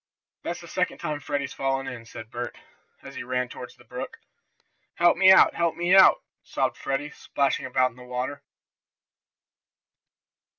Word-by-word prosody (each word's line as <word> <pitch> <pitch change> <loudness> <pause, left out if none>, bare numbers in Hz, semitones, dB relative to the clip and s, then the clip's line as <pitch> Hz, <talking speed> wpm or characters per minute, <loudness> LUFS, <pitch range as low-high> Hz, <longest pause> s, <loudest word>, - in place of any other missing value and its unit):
"That's - - -5
the - - -11
second - - -1
time 150 -1 -3
Freddie's 145 -1 -3
fallen 135 0 -1
in," 115 -2 -7
said 115 0 -10
Bert, 120 0 -5 0.5
as - - -10
he - - -6
ran 125 0 -2
toward 120 0 -9
the - - -18
brook. 125 +2 -7 0.8
"Help 175 0 +4
me 190 +2 +7
out! 190 - +7
Help 170 -1 0
me 175 +1 +1
out!" 190 - +7 0.2
sobbed - - -1
Freddie, 135 +2 -3
splashing 140 -2 -1
about 130 -1 +2
in 115 - -22
the 125 - -12
water. 125 +3 -4
135 Hz, 160 wpm, -26 LUFS, 125-150 Hz, 0.8 s, me